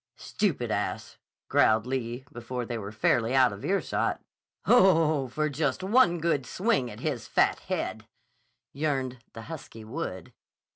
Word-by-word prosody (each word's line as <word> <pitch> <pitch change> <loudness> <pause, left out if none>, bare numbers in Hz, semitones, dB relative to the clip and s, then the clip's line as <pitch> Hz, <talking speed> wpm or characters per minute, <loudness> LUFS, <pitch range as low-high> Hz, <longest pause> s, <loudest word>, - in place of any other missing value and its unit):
"Stupid - - -1
ass!" - - -3 0.3
growled 110 +1 +3
Lee 125 -1 -3
before 120 +1 -5
they 115 0 -4
were 100 -1 -6
fairly 115 +3 +1
out 130 -5 +5
of 100 - -10
earshot. 195 +1 0 0.5
"Oh, 165 - +4
for 150 +5 -1
just 145 +3 -1
one 200 -3 +4
good 165 -4 0
swing 190 - 0
at - - -10
his - - -3
fat - - +2
head," - - -4 0.7
yearned 135 -4 -2
the 115 - -8
husky 140 -6 -9
Wood. 110 - -6
130 Hz, 140 wpm, -28 LUFS, 120-165 Hz, 0.7 s, out